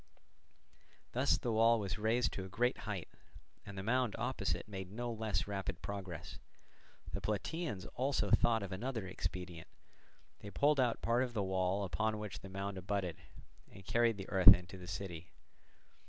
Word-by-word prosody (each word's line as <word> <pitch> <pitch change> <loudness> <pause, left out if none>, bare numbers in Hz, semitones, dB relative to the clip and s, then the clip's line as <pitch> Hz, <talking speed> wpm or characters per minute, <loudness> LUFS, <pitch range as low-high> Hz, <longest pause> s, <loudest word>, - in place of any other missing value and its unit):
Thus - - +3
the 120 - -2
wall 115 +1 +5
was 100 -1 -3
raised 115 +3 +2
to 95 - -4
a 95 - -8
great 125 +6 +1
height, 95 -5 -3 0.6
and 100 -1 -8
the 95 - -3
mound 125 0 +1
opposite - - -2
made 95 -3 -6
no 120 +2 -3
less 110 -2 -1
rapid 95 -3 -4
progress. 95 -5 -6 0.7
The - - -2
Plataeans 105 - -2
also 135 +2 0
thought 115 -3 +4
of 100 - -5
another 110 +2 -3
expedient; 90 -2 -5 0.7
they 100 - -8
pulled 145 +8 +3
out 125 -3 +1
part 120 +2 +3
of 125 -2 -2
the 105 - +1
wall 95 +1 +1
upon 110 +3 0
which 105 -2 -5
the 95 - -10
mound 100 0 -4
abutted, 95 -3 -2 0.5
and 95 - -13
carried 115 -1 +3
the 95 - -6
earth 95 0 +10
into 90 +2 -9
the 90 -1 -9
city. 85 -2 -6
100 Hz, 165 wpm, -35 LUFS, 95-115 Hz, 0.7 s, earth